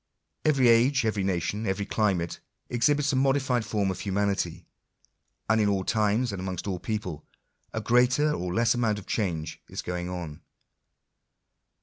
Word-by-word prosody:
Every 140 Hz, -5 st, +4 dB
age, 120 Hz, +2 st, +4 dB
every 105 Hz, -3 st, 0 dB
nation, 95 Hz, +3 st, -1 dB
every 95 Hz, +1 st, -1 dB
climate, 95 Hz, -6 st, 0 dB, 0.3 s
ex 120 Hz, -1 st, +3 dB
hibits 145 Hz, -1 st, +1 dB
a -, -, +2 dB
modified 130 Hz, -2 st, +2 dB
form 105 Hz, -2 st, 0 dB
of 95 Hz, -, -6 dB
humanity; 100 Hz, 0 st, -1 dB, 0.8 s
and 110 Hz, +1 st, +3 dB
in 105 Hz, -, +3 dB
all 95 Hz, -2 st, 0 dB
times, 110 Hz, +4 st, +1 dB
and 100 Hz, -, -5 dB
amongst 95 Hz, -2 st, -4 dB
all 95 Hz, -3 st, -2 dB
peoples, 95 Hz, -9 st, -4 dB, 0.5 s
a 110 Hz, -, -3 dB
greater 125 Hz, +6 st, +3 dB
or 90 Hz, -6 st, -3 dB
less 115 Hz, +5 st, +3 dB
amount 115 Hz, -4 st, +1 dB
of 105 Hz, -, -8 dB
change 85 Hz, -7 st, -2 dB
is -, -, -5 dB
going 90 Hz, 0 st, -3 dB
on. 85 Hz, -5 st, -6 dB
105 Hz, 155 wpm, -27 LUFS, 95-120 Hz, 0.8 s, Every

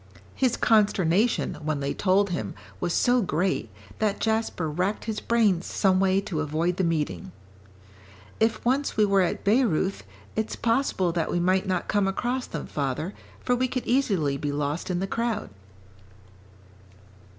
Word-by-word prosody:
His 255 Hz, -3 st, +1 dB
consternation, 210 Hz, -1 st, +2 dB
when 155 Hz, -1 st, -1 dB
they 140 Hz, 0 st, -2 dB
told 195 Hz, 0 st, +2 dB
him, 110 Hz, -, -3 dB, 0.2 s
was 175 Hz, -, -1 dB
so 245 Hz, +7 st, +3 dB
great, 185 Hz, 0 st, -1 dB, 0.3 s
that 210 Hz, -2 st, 0 dB
Jasper 220 Hz, -7 st, 0 dB
racked 180 Hz, +7 st, -2 dB
his 220 Hz, -1 st, -2 dB
brains 210 Hz, -7 st, +2 dB
some 190 Hz, -2 st, +2 dB
way 190 Hz, 0 st, +3 dB
to 170 Hz, -5 st, -4 dB
avoid 160 Hz, +4 st, -1 dB
the 190 Hz, -, +1 dB
meeting. 150 Hz, -, -1 dB, 1.1 s
"If 225 Hz, +1 st, +1 dB
once 265 Hz, +2 st, +1 dB
we 215 Hz, -, +5 dB
were 200 Hz, -1 st, +3 dB
at 180 Hz, -, -1 dB
Bayreuth, 200 Hz, -, +2 dB, 0.3 s
it's 220 Hz, 0 st, -2 dB
possible 230 Hz, -6 st, +1 dB
that 165 Hz, -1 st, -1 dB
we 175 Hz, -, 0 dB
might 185 Hz, +2 st, +2 dB
not 185 Hz, -2 st, -1 dB
come 205 Hz, -2 st, +1 dB
across 245 Hz, +6 st, -2 dB
them, 165 Hz, -, -5 dB
father, 145 Hz, +6 st, -3 dB, 0.3 s
for 245 Hz, -, +1 dB
we 255 Hz, +1 st, +1 dB
could 255 Hz, 0 st, -3 dB
easily 195 Hz, -, +1 dB
be 145 Hz, +1 st, -2 dB
lost 145 Hz, +4 st, -2 dB
in 180 Hz, 0 st, -1 dB
the -, -, 0 dB
crowd." 230 Hz, -, -2 dB
190 Hz, 155 wpm, -26 LUFS, 165-220 Hz, 1.1 s, we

